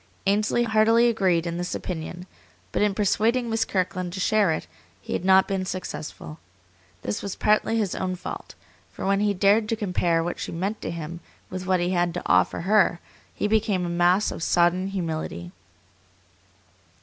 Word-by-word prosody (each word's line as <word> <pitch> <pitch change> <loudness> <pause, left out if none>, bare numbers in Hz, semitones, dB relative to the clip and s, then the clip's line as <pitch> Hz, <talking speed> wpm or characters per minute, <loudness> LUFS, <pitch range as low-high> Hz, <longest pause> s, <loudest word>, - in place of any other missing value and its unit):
Ainsley 210 +4 +2
heartily 225 +1 +4
agreed 185 -7 +1
in 170 0 -3
this 180 0 -3
opinion, 175 +1 -5 0.5
but - - -1
in 210 -2 +2
persuading 225 +4 +1
Miss 225 0 +1
Kirkland 185 -1 -2
to 190 - -5
share 205 -2 +3
it - - -2 0.3
he - - -6
had - - -2
not 190 0 +5
been 195 -1 -1
successful. 180 -4 -6 0.6
This 105 - -3
was 200 - -4
partly 215 +2 +2
his 205 -5 0
own 185 -1 -2
fault; 180 - -8 0.4
for - - -6
when 195 0 +2
he 205 -1 +1
dared 205 +3 +3
to 225 - +1
compare 180 -6 0
what 175 - -4
she - - -4
meant 195 +6 -3
to - - -4
him 170 0 -6 0.3
with 185 0 -5
what 185 -1 +3
he 175 +1 0
had 175 -1 0
to 175 - -4
offer 90 - +2
her 195 -1 +3 0.4
he - - 0
became 210 -4 +1
a - - -3
mass 175 +4 +2
of - - -7
sodden 175 +3 +2
humility. 160 - -4
185 Hz, 175 wpm, -25 LUFS, 175-210 Hz, 0.6 s, not